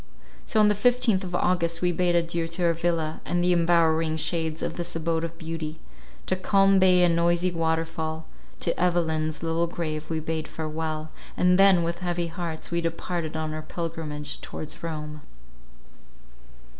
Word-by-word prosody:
So 220 - +1
on 210 - +6
the 210 - +4
fifteenth 230 -2 +2
of 180 -1 -4
August 170 -1 +1
we 180 - +3
bade 175 0 +1
adieu 170 -1 0
to 165 +2 -4
our 170 -1 +4
villa, 165 -2 -1
and 175 0 0
the 180 0 +4
embowering 165 -2 +3
shades 160 -1 -1
of - - -2
this 175 -1 -4
abode 165 0 -1
of 165 0 -5
beauty; 160 -2 -5 0.5
to 185 - 0
calm 195 +1 +4
bay 180 -1 +5
and 170 -1 +4
noisy 175 +2 +2
waterfall; 160 -1 -2 0.4
to 170 - +1
Evelyn's 160 -3 0
little 165 +1 +1
grave 155 -2 -4
we 160 -1 -1
bade 160 0 -3
farewell! 155 0 -4 0.3
and 180 +1 +4
then, 195 -3 +6
with 170 +1 -2
heavy 175 -1 -1
hearts, 165 -1 -5
we 170 0 0
departed 165 -1 -3
on 155 -1 -3
our 155 - -4
pilgrimage 155 -2 -5
towards 155 0 -7
Rome. 150 -2 -5
165 Hz, 165 wpm, -26 LUFS, 160-175 Hz, 0.5 s, on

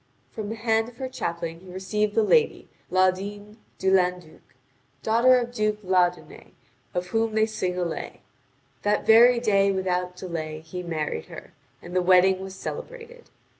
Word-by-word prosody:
From 215 -2 -6
the 225 - -4
hand 225 0 0
of 245 - -19
her 260 - -4
chaplain 170 -9 -4
he 185 0 -13
received 205 +3 -2
the 225 - +4
lady, 460 - +2 0.2
Laudine 200 +3 0 0.2
de 190 - +1
Landuc, 180 -4 0 0.6
daughter 235 +3 +5
of 240 0 -3
Duke 215 -2 0
Laudunet, 180 -1 -1 0.4
of 180 0 -2
whom 225 +1 0
they 220 0 +4
sing 200 -5 -3
a 180 - 0
lay. 165 - -6 0.6
That 205 0 0
very 235 +2 +7
day 200 -4 +3
without 180 -1 -1
delay 160 -4 -5
he 170 +3 -7
married 155 - -3
her, - - -12 0.3
and 175 +1 -9
the 185 - +3
wedding 185 +1 +4
was 190 0 -8
celebrated. 485 - -8
190 Hz, 160 wpm, -25 LUFS, 180-225 Hz, 0.6 s, very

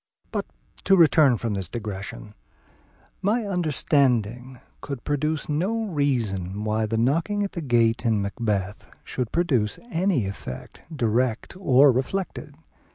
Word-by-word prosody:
But - - -2 0.4
to 195 - +6
return 155 -7 +5
from 115 -2 -2
this 95 -4 -3
digression, 105 -2 -6 0.9
my 215 +4 +1
understanding 130 - 0 0.2
could 140 -3 -5
furnish 150 +1 -1
no 190 +10 0
reason 110 - -1
why 110 0 0
the 115 +1 -1
knocking 165 - +1
at 200 - -3
the 170 - -5
gate 115 -5 +2
in 115 -3 +2
Macbeth 100 -1 -3
should 125 -3 -4
produce 130 -12 +1
any 170 - +1
effect, 95 -9 -7
direct 120 -2 0
or 140 -6 +5
reflected. 145 +2 -3
130 Hz, 125 wpm, -25 LUFS, 110-160 Hz, 0.9 s, to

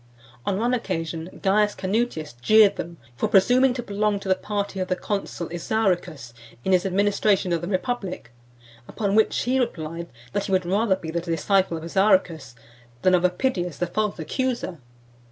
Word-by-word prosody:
On 195 - +1
one 240 +4 +1
occasion 165 -6 -3
Caius 205 +2 +3
Canutius 190 - -2
jeered 215 - +6
them 170 0 -6 0.2
for - - 0
presuming 250 +7 +5
to 245 - -4
belong 205 -1 0
to 200 - -8
the 190 - +5
party 200 0 -3
of 185 - -1
the 185 - 0
consul 195 -4 -4
Isauricus 175 - -1 0.3
in - - +1
his 185 +1 +3
administration 200 -1 +2
of 165 - 0
the 170 - -4
republic; 190 - -3 0.6
upon 200 -3 -2
which 220 +1 +3
he 255 +2 +1
replied, 170 -8 -3 0.3
that 205 0 -1
he - - -4
would 185 -1 +2
rather 195 +2 +2
be 165 -4 -7
the 170 +1 -1
disciple 175 +2 +1
of 160 - -8
Isauricus, 170 - +1 0.5
than 185 - +4
of 180 - +4
Epidius, 180 - 0
the 175 - 0
false 210 +4 -2
accuser. 235 - -3
190 Hz, 170 wpm, -24 LUFS, 170-210 Hz, 0.6 s, jeered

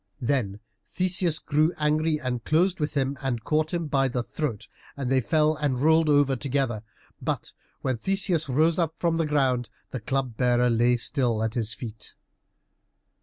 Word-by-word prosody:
Then 120 -6 -1 0.3
Theseus 180 -3 +1
grew 155 +2 +1
angry 155 +1 +1
and 125 -4 -3
closed 175 +4 +2
with 150 0 -2
him, 135 -1 -1
and 125 -5 -2
caught 155 +3 0
him 170 -2 -2
by 135 -2 +1
the 125 -1 -2
throat, 120 -6 -4 0.3
and 135 -2 -3
they 130 -1 +3
fell 155 +4 +2
and 140 -4 0
rolled 160 +3 +3
over 145 -2 +4
together. 130 -4 -1 0.4
But - - -3 0.3
when 130 -2 0
Theseus 185 - +1
rose 160 +6 +2
up 165 -2 0
from 170 -1 0
the 165 -2 0
ground 130 -5 +1 0.2
the 130 - -4
Club 130 0 -2
bearer 125 -1 +3
lay 120 +1 +3
still 120 -3 0
at 110 0 -1
his 115 -1 -2
feet. 110 -3 -7
140 Hz, 170 wpm, -26 LUFS, 125-155 Hz, 0.4 s, over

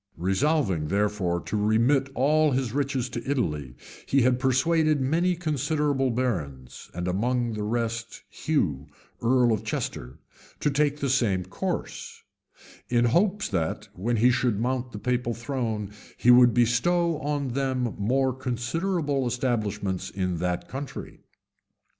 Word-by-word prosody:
Resolving, 95 - +1
therefore, 100 -2 0
to - - -4
remit 115 +7 +2
all 155 +4 +3
his 130 -4 -1
riches 135 -3 -1
to 120 -1 -5
Italy, 75 - -1 0.3
he 135 -2 +3
had 125 0 +3
persuaded 150 +4 +2
many 165 +7 +1
considerable 150 -4 0
barons, 85 - -3
and 90 +1 -3
among 120 +5 0
the 105 - -4
rest 115 +1 -3
Hugh, 75 - -1 0.3
earl 120 0 +3
of 110 - -2
Chester, - - -4 0.4
to 150 - +1
take 145 +1 +1
the 140 - -2
same 110 -9 +1
course; 95 - -5 0.7
in 120 0 +3
hopes 190 - +2
that, 85 -5 -2
when 115 +6 -1
he 120 +3 +4
should 120 -4 +1
mount 125 +1 -1
the 105 - -7
papal 125 0 -1
throne, 115 -4 -3 0.3
he 125 - +5
would 125 0 +7
bestow 165 +8 +2
on 145 -1 -2
them 130 -2 -1
more 130 +5 +1
considerable 135 +3 -1
establishments 105 -6 -1
in 90 -2 -2
that 90 +1 -2
country. 135 +1 -7
125 Hz, 135 wpm, -26 LUFS, 105-140 Hz, 0.7 s, would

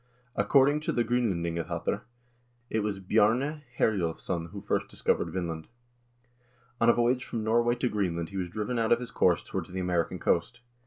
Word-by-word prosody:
According 140 +2 +4
to 155 - -2
the 120 - +1
"Gr0nlendingabattr," 85 -9 -1 0.7
it 110 - +1
was 105 -2 -1
Bjarne 115 +10 +2 0.2
Herjolvsson 85 -3 0
who - - -7
first - - -1
discovered - - 0
Vinland. 85 -4 -4 1.1
On 115 - +5
a - - +7
voyage 125 +2 +2
from 115 -3 -4
Norway 120 +2 +3
to 125 +1 0
Green 100 -7 0
land 85 -1 -3
he 100 - -6
was 90 -2 -2
driven 110 +6 -2
out 115 -1 +1
of 120 - +5
his 125 -1 -7
course - - +3
towards - - -4
the 95 +1 -4
American 90 -2 0
coast. 120 +9 0
110 Hz, 170 wpm, -29 LUFS, 90-120 Hz, 1.1 s, a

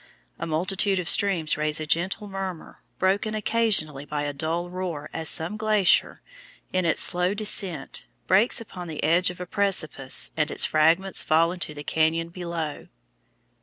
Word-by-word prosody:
A - - -3
multitude 190 +5 0
of 180 -2 -2
streams 170 -3 +2
raise 150 0 -1
a 155 - -3
gentle 185 +7 0
murmur, 190 -4 -6 0.2
broken 200 +3 +1
occasionally 210 -10 +1
by 145 0 -3
a 145 0 -3
dull 165 +4 -2
roar 175 -4 -5
as 160 -1 -1
some 170 +7 -2
glacier, 215 -3 +2 0.5
in 185 -1 +1
its 170 - +2
slow 180 +2 +1
descent, 195 -7 -1 0.2
breaks 205 +8 +3
upon 185 -6 -8
the 155 -2 -5
edge 170 +4 +3
of 180 - -8
a 180 - -5
precipice 175 -9 0
and 155 -1 +1
its - - +3
fragments 165 +5 +3
fall 165 +2 +3
into 175 -4 -6
the 145 - -7
cañon 165 +2 0
below. 170 -4 -5
175 Hz, 160 wpm, -25 LUFS, 155-195 Hz, 0.5 s, breaks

